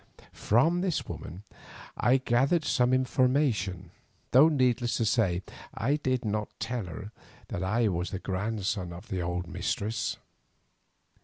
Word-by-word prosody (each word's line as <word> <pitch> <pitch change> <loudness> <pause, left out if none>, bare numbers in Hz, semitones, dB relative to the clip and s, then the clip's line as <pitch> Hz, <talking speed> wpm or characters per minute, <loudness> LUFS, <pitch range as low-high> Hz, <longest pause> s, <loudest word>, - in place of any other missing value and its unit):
From 160 - +2
this 180 -4 -1
woman 90 +5 -8 0.5
I 125 +4 +3
gathered 135 +6 +2
some 125 -4 +2
information, 125 - +1 0.4
though, 140 +6 +7
needless 125 -5 +1
to 115 - +1
say, 100 -5 +1 0.3
I 140 +6 +1
did 130 -5 -1
not 105 0 -1
tell 120 -3 -3
her 100 +5 -8 0.4
that 85 - -3
I 110 +5 +2
was 90 -2 -1
the 95 - -4
grandson 95 -2 -2
of 100 +7 -11
her 95 -2 -1
old 90 +1 -2
mistress. 110 +5 -2
115 Hz, 135 wpm, -29 LUFS, 95-130 Hz, 0.5 s, though